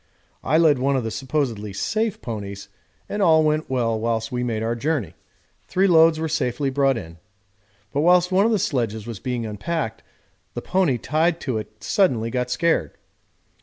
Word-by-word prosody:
I 155 - +2
led 155 -5 +4
one 135 +2 +1
of 130 - 0
the 110 - -3
supposedly 125 -7 -2
safe 215 - -2
ponies, 100 -3 -6 0.4
and 205 - -3
all 160 -4 +5
went 155 0 0
well 115 -4 0
whilst 115 0 -1
we 125 0 -2
made 115 -3 -2
our 115 +1 0
journey; 125 - -2 0.5
three 190 +2 +2
loads 165 -3 +5
were 160 - -1
safely 140 -2 -1
brought 135 -1 +2
in. 85 -4 -9 0.7
But 145 - +1
whilst 180 +2 +4
one 195 +3 +4
of - - +1
the 220 - +3
sledges 120 - -2
was 115 -4 -7
being 125 -3 -3
unpacked 110 +2 -3 0.5
the - - -3
pony 180 -9 +1
tied 160 +7 0
to 125 -5 -2
it 110 0 -11
suddenly 125 - +1
got 125 0 -1
scared. 125 - 0
130 Hz, 175 wpm, -23 LUFS, 115-160 Hz, 0.7 s, all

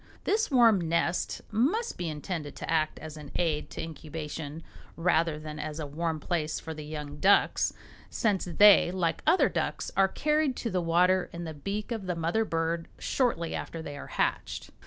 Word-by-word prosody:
This 440 +2 +1
warm 230 - +5
nest 170 +1 0
must 320 - +1
be 175 -2 -3
intended 150 -1 -5
to - - -6
act 155 -1 +1
as 155 0 -8
an 150 -2 -9
aid 160 -4 0
to - - -5
incubation 155 -1 -6 0.3
rather 165 -2 +2
than 155 0 -7
as 155 +1 -4
a 155 - -3
warm 160 +2 -2
place 155 -1 -1
for 160 - -6
the 155 -1 -7
young 150 -1 -6
ducks, 195 +6 +4 0.4
since 210 -5 0
they, 195 +1 +7
like 180 -3 -1
other 345 +4 +5
ducks, - - -2
are 195 0 +5
carried 300 +4 +1
to 230 - -3
the 185 -1 +1
water 180 +2 +3
in 170 0 -6
the 160 -2 -5
beak 200 - -4
of 220 -5 -3
the 180 - -1
mother 170 +7 +1
bird 165 -1 -1
shortly 230 -11 0
after 165 - -5
they 145 -3 -6
are 145 - -8
hatched. - - -2
165 Hz, 180 wpm, -29 LUFS, 155-195 Hz, 0.4 s, they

